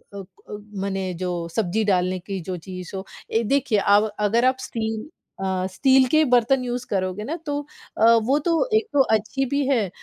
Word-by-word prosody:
क 200 +2 -10 0.2
मने 195 -2 -2
जो 185 -1 -2 0.3
सब्जी 215 +1 0
डालने 185 -2 +1
की 190 +2 -5
जो 185 - -4
चीज़ 185 -2 -8
हो। 190 0 -5 0.3
ए 225 +1 +2
देखिए 255 -2 +1
अब 205 +2 +4
अगर 220 +4 +2
आप 260 0 +3
स्टील 220 -3 -4 0.4
अ, 185 -1 -1
स्टील 265 +3 +4
के 310 0 +5
बर्तन 250 +2 +3
यूज़ 245 0 -3
करोगे 185 +1 -2
ना, 295 +9 -3
तो 290 -1 -2 0.4
अ, 220 - +1 0.2
वो 270 +6 +2
तो 335 +8 +2
एक 440 0 -1
तो 285 - +5
अच्छी 235 +6 -1
भी 280 +1 0
है, 235 -8 +1
220 Hz, 185 wpm, -23 LUFS, 190-260 Hz, 0.4 s, के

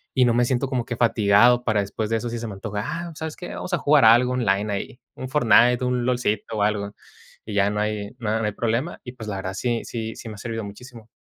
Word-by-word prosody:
y 130 - +4
no 120 - +3
me 120 0 +3
siento 130 +2 0
como 125 -3 -1
que 120 - -4
fatigado 115 +1 +4
para 105 -2 +2
después 105 +2 -4
de 115 - +2
eso 120 +2 -4
si 120 - -4
se 115 - -5
me 105 - -6
antoja: 105 +1 -4
"Ah, 170 - -4
¿pues 165 -2 -11
sabes 160 -1 -5
qué? 180 - -8
Vamos 180 - -6
a 175 - +2
jugar 145 -3 +4
algo 120 +3 +6
online 105 -4 0
ahí, 100 +5 -5
un 130 - -6
Fortnite, 125 -2 +4
un 125 -1 0
lolcito 115 -3 -1
o 105 - -1
algo", 105 -1 -1 0.5
y 110 - -6
ya 100 0 +3
no 105 - -2
hay 105 -1 -2
no 115 -3 -3
hay 105 - 0
problema 120 +10 -2
y 125 - -8
pues 115 -4 -9
la 100 -2 -3
verdad 95 0 -4
sí 120 +2 -1
sí 110 -1 -5
sí 115 - -9
me 110 - -8
ha - - -13
servido 115 +1 -5
muchísimo. 115 +3 -11
115 Hz, 260 wpm, -23 LUFS, 105-125 Hz, 0.5 s, algo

